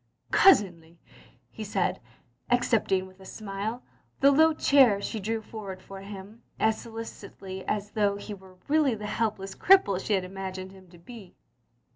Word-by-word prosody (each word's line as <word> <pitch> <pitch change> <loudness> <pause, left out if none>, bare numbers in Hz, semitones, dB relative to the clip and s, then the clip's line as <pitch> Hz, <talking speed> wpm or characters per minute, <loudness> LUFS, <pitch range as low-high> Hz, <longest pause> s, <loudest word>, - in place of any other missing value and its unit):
"Cousinly!" 175 - +4 0.5
he - - -7
said, - - -1 0.5
accepting, 225 -6 +2
with 185 0 -17
a - - -14
smile, 215 +4 -5 0.4
the 275 +1 +6
low 315 +3 +5
chair 270 -9 +4
she 220 +2 -4
drew 220 +2 -3
forward 200 -4 -8
for 195 +1 -11
him 200 +2 -10 0.2
as 220 0 +1
solicit 225 -3 -9
ously 190 -1 -8
as 205 0 -2
though 205 -2 +1
he 205 +1 -7
were 190 -2 -14
really 295 -4 +3
the 210 -1 -7
helpless 210 -3 -2
cripple 205 - +4
she 215 - -1
had 190 -2 +1
imagined 190 0 -6
him 190 -1 -16
to 175 - -16
be. 200 +1 -13
205 Hz, 160 wpm, -27 LUFS, 190-225 Hz, 0.5 s, the